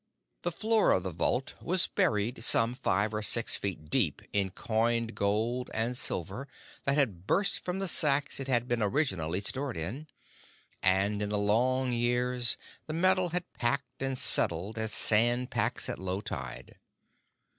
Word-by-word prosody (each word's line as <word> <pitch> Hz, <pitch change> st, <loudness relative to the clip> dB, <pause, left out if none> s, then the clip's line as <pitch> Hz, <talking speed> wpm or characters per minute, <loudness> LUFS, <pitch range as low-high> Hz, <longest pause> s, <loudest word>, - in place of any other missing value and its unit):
The 175 Hz, -, -2 dB
floor 220 Hz, +4 st, +2 dB
of 95 Hz, -, 0 dB
the 95 Hz, -, -3 dB
vault 125 Hz, +10 st, -1 dB
was 185 Hz, +1 st, +1 dB
buried 110 Hz, +3 st, 0 dB
some 115 Hz, 0 st, +5 dB
five 110 Hz, -5 st, 0 dB
or 105 Hz, -, -2 dB
six 115 Hz, +2 st, +4 dB
feet 85 Hz, -6 st, -5 dB
deep 100 Hz, -, +1 dB
in 100 Hz, -2 st, +1 dB
coined 115 Hz, +3 st, -1 dB
gold 110 Hz, +5 st, -1 dB
and 115 Hz, +3 st, -1 dB
silver 100 Hz, -, -2 dB, 0.4 s
that 140 Hz, +1 st, +2 dB
had 100 Hz, -, 0 dB
burst 195 Hz, +7 st, +2 dB
from 180 Hz, +1 st, -4 dB
the 195 Hz, 0 st, -1 dB
sacks 145 Hz, -5 st, +2 dB
it 135 Hz, -, -4 dB
had 120 Hz, -2 st, +2 dB
been 120 Hz, -2 st, -1 dB
originally 100 Hz, -, 0 dB
stored 130 Hz, +3 st, -3 dB
in, 110 Hz, -, -5 dB, 0.7 s
and, 95 Hz, +2 st, +2 dB
in 105 Hz, -, -2 dB
the 105 Hz, -, -1 dB
long 125 Hz, +5 st, +1 dB
years, 120 Hz, +1 st, +1 dB, 0.3 s
the 155 Hz, -, -4 dB
metal 185 Hz, +2 st, +2 dB
had 180 Hz, +1 st, -1 dB
packed 125 Hz, +4 st, -2 dB
and 135 Hz, -1 st, -2 dB
settled 110 Hz, -6 st, +2 dB
as 110 Hz, 0 st, -2 dB
sand 120 Hz, +3 st, +2 dB
packs -, -, 0 dB
at -, -, -4 dB
low 95 Hz, +1 st, -3 dB
tide. 65 Hz, -, -7 dB
120 Hz, 160 wpm, -30 LUFS, 100-135 Hz, 0.7 s, some